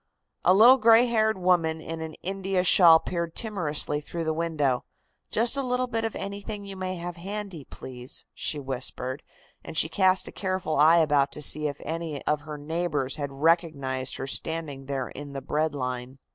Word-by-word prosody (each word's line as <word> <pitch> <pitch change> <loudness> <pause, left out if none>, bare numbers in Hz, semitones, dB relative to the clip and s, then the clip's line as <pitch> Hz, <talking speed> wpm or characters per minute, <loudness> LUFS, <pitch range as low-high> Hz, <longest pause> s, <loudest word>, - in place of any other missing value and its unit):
A 185 - +5
little 240 +6 +8
gray 230 0 +6
haired 220 -3 +1
woman 175 -3 +2
in 160 0 -6
an 160 -1 -6
India 190 0 -1
shawl 170 -3 +7
peered 170 -1 -4
timorously 155 -9 -1
through 165 +3 -5
the 160 0 0
window. 150 -6 0 0.5
"Just 230 +4 +2
a 275 - +1
little 250 -1 0
bit 230 -2 -2
of 225 - -3
anything 200 +1 -5
you 195 -1 -8
may 185 0 -3
have 175 0 -6
handy, 195 -4 -6
please," 125 0 -9
she 150 - -2
whispered, 130 0 -3 0.4
and 165 -1 -7
she 160 - +3
cast 185 +1 +2
a - - -7
careful 185 -5 -2
eye 160 +3 +6
about 145 -4 +3
to 150 - -6
see 150 +1 +1
of 145 -1 -5
any 160 -2 -4
of 150 -1 +1
her 150 0 -7
neighbors 150 -3 -2
had 140 -2 -4
recognized 140 -4 0
her 135 - -4
standing 145 -1 -3
there 135 -2 -3
in 145 0 -9
the 135 - -5
"bread 150 +2 -1
line." 125 -1 -4
160 Hz, 185 wpm, -26 LUFS, 145-190 Hz, 0.5 s, little